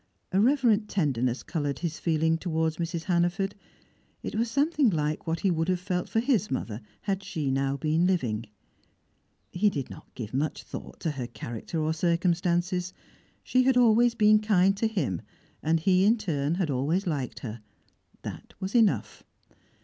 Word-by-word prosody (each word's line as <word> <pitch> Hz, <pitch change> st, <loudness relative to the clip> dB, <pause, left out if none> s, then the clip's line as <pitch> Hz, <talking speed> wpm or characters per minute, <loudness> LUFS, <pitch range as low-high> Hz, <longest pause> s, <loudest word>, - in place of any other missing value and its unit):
A 190 Hz, -, +3 dB
reverent 230 Hz, -4 st, +3 dB
tenderness 130 Hz, -, 0 dB
coloured 145 Hz, -4 st, -2 dB
his 170 Hz, -2 st, -4 dB
feeling 160 Hz, -1 st, +2 dB
towards 160 Hz, -2 st, -1 dB
Mrs. 170 Hz, -1 st, -3 dB
Hannaford; 175 Hz, +2 st, +1 dB, 0.7 s
it -, -, -4 dB
was 230 Hz, +2 st, 0 dB
something 285 Hz, +1 st, +3 dB
like 155 Hz, -2 st, -1 dB
what 165 Hz, 0 st, -1 dB
he 195 Hz, -, +2 dB
would 165 Hz, +1 st, 0 dB
have 180 Hz, -1 st, +1 dB
felt 180 Hz, -1 st, -2 dB
for 225 Hz, -, +1 dB
his 240 Hz, -5 st, +1 dB
mother 115 Hz, -4 st, -3 dB, 0.2 s
had 195 Hz, -1 st, -1 dB
she 155 Hz, -8 st, -2 dB
now 135 Hz, +1 st, 0 dB
been 160 Hz, +5 st, +2 dB
living. 120 Hz, -, 0 dB, 1.0 s
He 205 Hz, +4 st, +3 dB
did 140 Hz, -9 st, -4 dB
not -, -, -11 dB
give 110 Hz, -3 st, -6 dB
much 145 Hz, +4 st, -1 dB
thought -, -, -9 dB
to 165 Hz, -, 0 dB
her 130 Hz, -4 st, -4 dB
character 120 Hz, +6 st, -5 dB
or 155 Hz, +1 st, +1 dB
circumstances; 175 Hz, +2 st, +1 dB, 0.5 s
she 255 Hz, -, +3 dB
had 265 Hz, -1 st, +4 dB
always 235 Hz, 0 st, +5 dB
been 215 Hz, -1 st, +5 dB
kind 195 Hz, -3 st, +3 dB
to 225 Hz, -, +1 dB
him, 150 Hz, -, -1 dB, 0.4 s
and 165 Hz, +1 st, +2 dB
he 185 Hz, +3 st, +3 dB
in 220 Hz, +4 st, +5 dB
turn 160 Hz, -7 st, -1 dB
had 175 Hz, -5 st, 0 dB
always 150 Hz, +9 st, 0 dB
liked 145 Hz, -8 st, -3 dB
her: 115 Hz, -2 st, -6 dB, 0.6 s
that -, -, -8 dB
was 190 Hz, 0 st, -4 dB
enough. 230 Hz, -4 st, +2 dB
175 Hz, 165 wpm, -27 LUFS, 150-200 Hz, 1.0 s, always